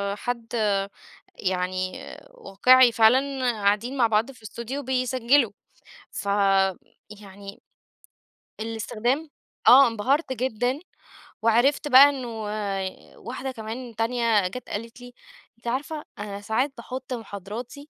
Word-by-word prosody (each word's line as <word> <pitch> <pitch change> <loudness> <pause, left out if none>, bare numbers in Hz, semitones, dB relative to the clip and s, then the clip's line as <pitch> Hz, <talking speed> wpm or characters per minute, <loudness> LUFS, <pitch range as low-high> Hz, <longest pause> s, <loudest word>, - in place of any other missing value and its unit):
حد 235 +1 -5 0.8
يعني 185 0 -2 0.3
واقعي 255 - +4
فعلًا 255 +3 +3
قاعدين 210 +5 0
مع 240 -3 +4
بعض 225 +4 +1
في 250 - -18
الأستوديو 235 +6 -6
بيسجّلوا، 255 -1 +2 0.6
فيعني 200 0 -2 1.0
الاستخدام 230 +6 -2 0.4
آه 270 +1 +9
انبهرت 260 +6 0
جدًا، 250 +2 -1 0.6
وعرفت 240 +7 +2
بقى 275 +2 +9
إنّه 265 -3 -5 0.9
واحدة 260 +2 -5
كمان 230 +1 -7
تانية 225 -3 +1
جات 250 +7 -8
قالت 230 +3 -6
لي: 245 0 -12 0.4
"أنتِ 235 +1 -13
عارفة 295 +5 -3
أنا 205 -1 -6
ساعات 250 +7 -1
باحط 255 +2 -6
مُحاضراتي 230 +6 -8
235 Hz, 100 wpm, -25 LUFS, 210-260 Hz, 1.0 s, آه